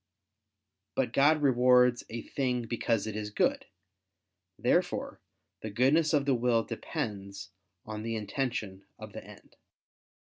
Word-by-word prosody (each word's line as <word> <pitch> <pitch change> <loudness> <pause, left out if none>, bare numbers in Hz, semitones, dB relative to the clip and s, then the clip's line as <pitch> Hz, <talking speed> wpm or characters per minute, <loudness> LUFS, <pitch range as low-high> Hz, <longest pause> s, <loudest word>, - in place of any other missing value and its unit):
But - - 0
God 150 +2 +4
rewards 125 -2 +4
a 115 0 -5
thing 125 -3 -1
because 115 -2 -1
it 110 -1 -5
is 105 -1 -4
good. 105 - 0 0.9
Therefore - - 0 0.4
the 110 - -5
goodness 135 +9 +3
of 145 -3 +2
the 140 - +3
will 120 -2 +2
depends 100 -3 -5 0.3
on 105 0 -6
the 115 +1 -3
intention 105 -3 -3
of - - -10
the - - -8
end. - - -16
120 Hz, 130 wpm, -30 LUFS, 105-130 Hz, 0.9 s, God